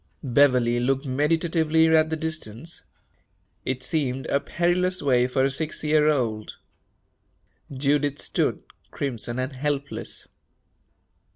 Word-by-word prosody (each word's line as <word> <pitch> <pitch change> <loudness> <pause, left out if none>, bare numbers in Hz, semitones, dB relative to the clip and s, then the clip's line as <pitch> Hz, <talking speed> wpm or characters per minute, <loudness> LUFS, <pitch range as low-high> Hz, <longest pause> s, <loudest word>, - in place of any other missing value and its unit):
Beverley 125 -3 +3
looked 135 +3 0
meditatively 160 +3 +2
at 155 0 +4
the 160 - -1
distance. 160 -2 -5 0.8
It 130 -1 -2
seemed 135 -4 -1
a 140 - +1
perilous 175 +4 0
way 125 -3 +3
for 130 +1 +1
a 135 - +2
six 155 +3 -3
year 150 0 +4
old. 115 -7 -1 1.2
Judith 145 +1 0
stood, - - -1 0.3
crimson 120 -3 -4
and 130 +2 -2
helpless. 145 +1 -4
140 Hz, 110 wpm, -25 LUFS, 130-155 Hz, 1.2 s, at